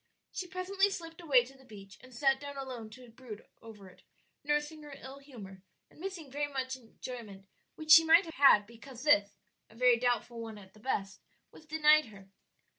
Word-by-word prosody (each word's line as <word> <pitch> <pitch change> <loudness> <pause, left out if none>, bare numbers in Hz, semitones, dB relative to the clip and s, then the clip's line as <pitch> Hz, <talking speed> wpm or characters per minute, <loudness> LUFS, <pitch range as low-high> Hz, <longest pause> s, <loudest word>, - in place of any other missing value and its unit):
She 365 - -5
presently 380 +2 0
slipped 330 -3 -8
away 265 -7 +4
to 270 +2 -15
the 265 - -19
beach 200 -5 -13
and 255 - -16
sat 270 +2 +1
down 285 0 -8
alone 255 -5 -7
to 250 +3 -14
brood 230 -3 -11 0.2
over 215 -4 -13
it, 185 - -18 0.4
nursing 295 +1 -1
her 295 -2 -10
ill 270 +1 -10
humor 210 -9 -12 0.3
and - - -20
missing 345 -6 -7 0.2
much 260 -1 -3
enjoyment 225 -5 -10 0.3
which 310 -1 -3
she 325 +1 +10
might 325 +2 +6
have 325 - -9
had 275 -9 +6
because 235 +3 -12
this 205 -9 +3 0.3
a 220 - -19
very 245 0 +4
doubtful 240 -1 -1
one 225 -2 -8
at 190 -2 -15
the 215 - -18
best 205 -4 -3 0.3
was 315 - -17
denied 305 0 +4
her. 195 -3 -15
260 Hz, 190 wpm, -31 LUFS, 220-300 Hz, 0.4 s, she